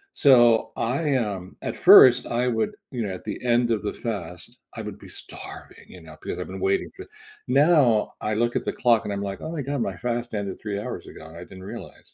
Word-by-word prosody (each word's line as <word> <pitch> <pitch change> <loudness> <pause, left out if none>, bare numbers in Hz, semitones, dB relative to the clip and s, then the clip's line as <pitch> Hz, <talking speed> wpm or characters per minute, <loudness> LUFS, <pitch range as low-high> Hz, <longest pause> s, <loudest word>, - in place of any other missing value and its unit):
So 120 -5 +5
I, 140 +5 0
um 100 -7 -3
at - - -4
first, 125 -1 +8
I 120 +1 0
would 110 -2 -1 0.2
you 125 -4 -3
know, 95 - -4
at 90 - -9
the - - -5
end 120 0 +2
of 110 -2 -1
the 105 - -3
fast, 90 -7 -6 0.2
I - - -5
would - - -8
be - - -13
starving, - - -11
you 90 - -13
know, 80 -1 -13
because 85 - -5
I've 90 - -5
been 95 +1 -7
waiting 95 +1 0
for - - -9 0.4
now 135 -5 +3
I 105 - -1
look 120 +2 0
at - - -4
the - - -2
clock, 115 -3 +2
I'm 100 -1 -3
like, 100 -1 -5
"Oh 160 - -5
my 160 -3 -4
god. 140 -1 -3
My 95 -3 -2
fast 120 +3 -3
ended 100 -3 -4
3 105 -2 -4
hours - - -6
ago, 80 - -12
and 80 +1 -13
I 90 - -9
didn't 95 +1 -12
realize." 100 - -11
110 Hz, 230 wpm, -24 LUFS, 95-125 Hz, 0.4 s, first